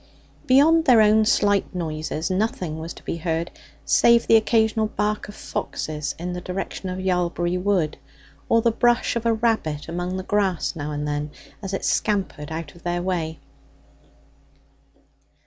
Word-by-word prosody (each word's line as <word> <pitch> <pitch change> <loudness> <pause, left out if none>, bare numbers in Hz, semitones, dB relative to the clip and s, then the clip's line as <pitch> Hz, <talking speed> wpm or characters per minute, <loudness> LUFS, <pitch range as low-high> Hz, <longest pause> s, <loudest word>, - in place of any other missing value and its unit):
Beyond 315 +5 +5
their 250 -4 +6
own 215 0 +5
slight 205 -3 +2
noises 160 0 -3
nothing 185 -5 -1
was 165 +1 -6
to - - -14
be - - -3
heard, 165 0 -2 0.3
save 235 0 +4
the - - +5
occasional 220 -1 +3
bark 210 0 -2
of 205 - -10
foxes 150 -2 -4
in 180 +2 -4
the 180 - -5
direction 185 +1 -5
of 185 - -4
Yalbury 180 -1 0
Wood, 180 -5 0 0.5
or 230 -1 +4
the 235 - +4
brush 240 +1 +2
of 235 0 -1
a 230 - +4
rabbit 220 -10 -1
among 175 +2 -3
the 185 - -4
grass 195 -3 0
now 150 -1 -4
and 150 0 -3
then, 145 0 -2 0.3
as 195 -2 -5
it 195 - -3
scampered 190 -8 -1
out 160 -2 -5
of 170 - -17
their 175 0 -2
way. 165 -4 -2
185 Hz, 160 wpm, -23 LUFS, 165-215 Hz, 0.5 s, their